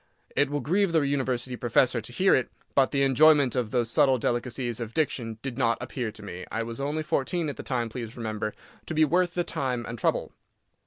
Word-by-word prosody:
It 145 Hz, -1 st, +3 dB
will 145 Hz, 0 st, -2 dB
grieve 180 Hz, +6 st, +1 dB
the 160 Hz, -, +4 dB
University 130 Hz, -3 st, -1 dB
professor 120 Hz, 0 st, +2 dB
to 110 Hz, -, -8 dB
hear 190 Hz, +10 st, +3 dB
it, 130 Hz, -, +2 dB, 0.2 s
but 135 Hz, -1 st, +4 dB
the 140 Hz, -1 st, +1 dB
enjoyment 140 Hz, -1 st, +5 dB
of 125 Hz, -4 st, 0 dB
those 120 Hz, -1 st, 0 dB
subtle 135 Hz, -3 st, +4 dB
delicacies 120 Hz, 0 st, -2 dB
of 115 Hz, -1 st, -6 dB
diction 120 Hz, -8 st, -1 dB
did 135 Hz, -2 st, -4 dB
not 115 Hz, -2 st, +2 dB
appear 120 Hz, -2 st, -4 dB
to 110 Hz, -, -11 dB
me—I 100 Hz, +4 st, -5 dB
was 115 Hz, +1 st, -6 dB
only 145 Hz, +3 st, -1 dB
fourteen 160 Hz, +1 st, -1 dB
at 145 Hz, -, -5 dB
the -, -, -7 dB
time, 120 Hz, -3 st, -1 dB
please 115 Hz, 0 st, -7 dB
remember—to 110 Hz, +6 st, -6 dB
be 155 Hz, 0 st, +5 dB
worth 175 Hz, +3 st, +1 dB
the 175 Hz, -, +1 dB
time 125 Hz, -7 st, -2 dB
and 115 Hz, 0 st, -6 dB
trouble. -, -, 0 dB
130 Hz, 205 wpm, -27 LUFS, 115-145 Hz, 0.2 s, enjoyment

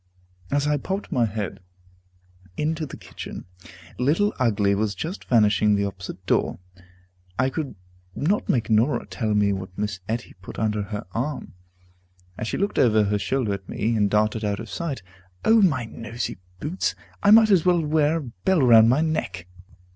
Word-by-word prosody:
As 145 Hz, 0 st, +1 dB
I 150 Hz, 0 st, +2 dB
popped 190 Hz, +8 st, -4 dB
my 125 Hz, -7 st, +3 dB
head 105 Hz, -3 st, -4 dB, 1.0 s
into 155 Hz, +1 st, -1 dB
the -, -, -9 dB
kitchen, -, -, -9 dB, 0.5 s
Little 165 Hz, +11 st, +2 dB
Ugly 105 Hz, -5 st, +2 dB
was 105 Hz, 0 st, 0 dB
just 175 Hz, +6 st, -5 dB
vanishing 105 Hz, -3 st, +4 dB
at -, -, +3 dB
the 100 Hz, -, +1 dB
opposite 95 Hz, -2 st, -7 dB
door. -, -, +1 dB, 0.8 s
I 130 Hz, +2 st, +2 dB
could 145 Hz, -6 st, -4 dB, 0.4 s
not 190 Hz, +9 st, 0 dB
make 115 Hz, -2 st, +1 dB
Norah 115 Hz, +7 st, +2 dB
tell 110 Hz, -3 st, -2 dB
me 100 Hz, -1 st, +3 dB
what 95 Hz, -1 st, -7 dB
Miss 105 Hz, -2 st, -2 dB
Etty 120 Hz, +2 st, -3 dB
put 95 Hz, -, -9 dB
under 105 Hz, -1 st, 0 dB
her 105 Hz, +2 st, -5 dB
arm, 135 Hz, +6 st, -3 dB, 0.8 s
as 110 Hz, -, -4 dB
she -, -, -2 dB
looked 200 Hz, +2 st, 0 dB
over 110 Hz, -3 st, +4 dB
her 105 Hz, 0 st, 0 dB
shoulder 120 Hz, 0 st, 0 dB
at 100 Hz, -1 st, -7 dB
me, 115 Hz, +2 st, 0 dB
and 105 Hz, -2 st, +2 dB
darted 105 Hz, +2 st, +1 dB
out 100 Hz, -1 st, -1 dB
of -, -, -8 dB
sight. 155 Hz, -, -4 dB, 0.4 s
O 225 Hz, 0 st, +6 dB
my 145 Hz, -, +2 dB
noisy 115 Hz, -2 st, -5 dB, 0.2 s
boots! 160 Hz, -, -2 dB, 0.3 s
I 200 Hz, -, +4 dB
might 220 Hz, 0 st, +7 dB
as 185 Hz, -5 st, +5 dB
well 175 Hz, -3 st, +3 dB
wear 155 Hz, +1 st, +2 dB
a -, -, -3 dB
bell 145 Hz, +7 st, 0 dB
round 115 Hz, -2 st, +7 dB
my 130 Hz, +5 st, +3 dB
neck. 125 Hz, -, -2 dB
115 Hz, 175 wpm, -24 LUFS, 105-155 Hz, 1.0 s, might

